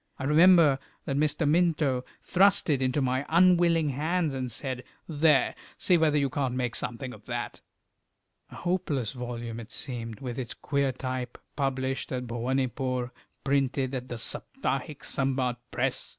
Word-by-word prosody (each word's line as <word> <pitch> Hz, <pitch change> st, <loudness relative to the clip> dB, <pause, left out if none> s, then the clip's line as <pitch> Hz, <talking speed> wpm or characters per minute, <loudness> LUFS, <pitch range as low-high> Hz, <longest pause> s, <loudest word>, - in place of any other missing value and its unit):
I -, -, -6 dB
remember 155 Hz, -1 st, +6 dB, 0.3 s
that 135 Hz, -, -1 dB
Mr. 150 Hz, +1 st, +1 dB
Minto 155 Hz, -5 st, +2 dB, 0.2 s
thrust 195 Hz, -2 st, +3 dB
it 135 Hz, -2 st, +1 dB
into 130 Hz, +2 st, +1 dB
my 130 Hz, +1 st, 0 dB
unwilling 170 Hz, -2 st, +4 dB
hands, 155 Hz, +3 st, 0 dB
and 130 Hz, -2 st, -3 dB
said 130 Hz, +2 st, -4 dB, 0.2 s
"There! 150 Hz, -2 st, +3 dB, 0.2 s
see 180 Hz, -, +3 dB
whether 155 Hz, -3 st, +3 dB
you 140 Hz, -1 st, +2 dB
can't 130 Hz, -1 st, -1 dB
make 125 Hz, -2 st, -1 dB
something 125 Hz, +2 st, -4 dB
of -, -, -15 dB
that." -, -, -4 dB, 0.9 s
A -, -, -12 dB
hopeless 150 Hz, -, -1 dB
volume 120 Hz, -2 st, -5 dB
it 115 Hz, +2 st, -10 dB
seemed, 115 Hz, -5 st, -5 dB
with 125 Hz, -2 st, -5 dB
its 120 Hz, -3 st, -5 dB
queer 140 Hz, -2 st, 0 dB
type, 130 Hz, -1 st, -4 dB, 0.2 s
published 135 Hz, -1 st, -1 dB
at 125 Hz, -1 st, -2 dB
Bhowanipore, 125 Hz, +1 st, -1 dB, 0.3 s
printed 135 Hz, -1 st, +1 dB
at 125 Hz, -1 st, -4 dB
the 120 Hz, -, -5 dB
Saptahiksambad 135 Hz, -, -2 dB
Press! -, -, -1 dB
135 Hz, 145 wpm, -28 LUFS, 125-150 Hz, 0.9 s, remember